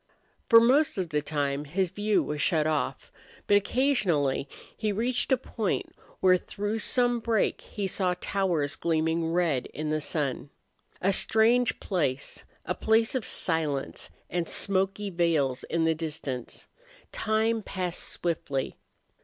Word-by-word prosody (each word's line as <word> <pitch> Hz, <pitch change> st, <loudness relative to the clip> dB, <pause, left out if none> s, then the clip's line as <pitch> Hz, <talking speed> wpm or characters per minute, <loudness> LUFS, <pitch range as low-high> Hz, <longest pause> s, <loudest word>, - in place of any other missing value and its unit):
For 230 Hz, -2 st, +9 dB
most 280 Hz, +6 st, +3 dB
of 185 Hz, -3 st, -2 dB
the 150 Hz, -1 st, 0 dB
time 145 Hz, -1 st, -2 dB
his 180 Hz, +4 st, -1 dB
view 205 Hz, 0 st, +1 dB
was 150 Hz, -1 st, -3 dB
shut 160 Hz, -4 st, +2 dB
off, 155 Hz, -3 st, -2 dB, 0.3 s
but 205 Hz, -, +4 dB
occasionally 195 Hz, -, +1 dB, 0.3 s
he 215 Hz, -1 st, -1 dB
reached 240 Hz, +6 st, -1 dB
a 265 Hz, -, +5 dB
point 220 Hz, -5 st, -3 dB, 0.3 s
where 185 Hz, -1 st, +6 dB
through 205 Hz, +4 st, -4 dB
some 245 Hz, +1 st, +3 dB
break 225 Hz, -2 st, 0 dB
he 205 Hz, -, -5 dB
saw 185 Hz, -1 st, 0 dB
towers 175 Hz, -9 st, 0 dB
gleaming 165 Hz, 0 st, 0 dB
red 165 Hz, -7 st, +1 dB
in 155 Hz, 0 st, -4 dB
the 155 Hz, 0 st, 0 dB
sun. 145 Hz, -3 st, -2 dB, 0.5 s
A 195 Hz, +2 st, +2 dB
strange 230 Hz, +5 st, +3 dB
place, 145 Hz, -8 st, -2 dB, 0.2 s
a -, -, -1 dB
place 225 Hz, +1 st, +2 dB
of 255 Hz, -5 st, -1 dB
silence, 155 Hz, -5 st, -2 dB, 0.2 s
and 175 Hz, -2 st, -2 dB
smoky 195 Hz, +1 st, 0 dB
veils 160 Hz, -7 st, +1 dB
in 165 Hz, -1 st, 0 dB
the 160 Hz, -, +3 dB
distance. 150 Hz, -6 st, -5 dB, 0.5 s
Time 220 Hz, +1 st, 0 dB
passed 185 Hz, -4 st, -3 dB
swiftly. 150 Hz, -6 st, -3 dB
180 Hz, 135 wpm, -27 LUFS, 155-215 Hz, 0.5 s, For